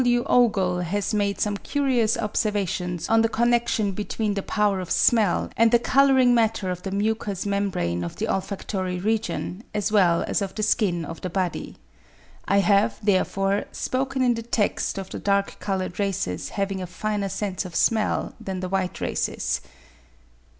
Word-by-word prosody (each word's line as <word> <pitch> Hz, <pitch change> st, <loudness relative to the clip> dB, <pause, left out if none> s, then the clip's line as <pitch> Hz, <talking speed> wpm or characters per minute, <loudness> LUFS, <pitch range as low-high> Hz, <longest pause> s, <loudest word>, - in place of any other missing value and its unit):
W. 240 Hz, -1 st, +2 dB
Ogle 195 Hz, -7 st, +3 dB
has 195 Hz, +4 st, -2 dB
made 200 Hz, -1 st, 0 dB
some 205 Hz, -1 st, 0 dB
curious 250 Hz, -4 st, +1 dB
observations 200 Hz, -5 st, -1 dB
on 225 Hz, 0 st, +4 dB
the 225 Hz, -, +2 dB
connection 235 Hz, -3 st, +1 dB
between 210 Hz, +2 st, -2 dB
the 200 Hz, -, -2 dB
power 205 Hz, -1 st, +1 dB
of 180 Hz, -2 st, -6 dB
smell 215 Hz, -7 st, +2 dB
and 230 Hz, 0 st, +4 dB
the 240 Hz, -, +7 dB
colouring 260 Hz, 0 st, +4 dB
matter 225 Hz, -5 st, +1 dB
of 180 Hz, 0 st, -5 dB
the 195 Hz, -, -4 dB
mucous 205 Hz, -1 st, -1 dB
membrane 195 Hz, -, -1 dB
of 85 Hz, -, -5 dB
the -, -, -2 dB
olfactory 190 Hz, -1 st, -2 dB
region 215 Hz, -1 st, -2 dB
as 210 Hz, 0 st, 0 dB
well 180 Hz, -5 st, +4 dB
as -, -, 0 dB
of 195 Hz, -1 st, -4 dB
the 215 Hz, -, -2 dB
skin 185 Hz, -6 st, +1 dB
of 165 Hz, +2 st, -8 dB
the 185 Hz, -, -3 dB
body. 185 Hz, 0 st, -3 dB, 0.7 s
I 200 Hz, 0 st, +4 dB
have, 200 Hz, +3 st, +3 dB
therefore, 195 Hz, 0 st, +1 dB
spoken 265 Hz, 0 st, -1 dB
in 245 Hz, -1 st, +4 dB
the 230 Hz, -, -4 dB
text 225 Hz, -3 st, -1 dB
of 190 Hz, -1 st, -6 dB
the -, -, -5 dB
dark 200 Hz, 0 st, 0 dB
coloured 190 Hz, -2 st, -3 dB
races 195 Hz, -, -2 dB
having 195 Hz, -1 st, -2 dB
a 180 Hz, -, -4 dB
finer 200 Hz, +2 st, -2 dB
sense 195 Hz, -1 st, -3 dB
of 180 Hz, -3 st, -9 dB
smell 220 Hz, -2 st, +1 dB
than 190 Hz, -1 st, -5 dB
the 185 Hz, -, -3 dB
white 185 Hz, -1 st, -2 dB
races. -, -, -1 dB
200 Hz, 170 wpm, -24 LUFS, 185-225 Hz, 0.7 s, the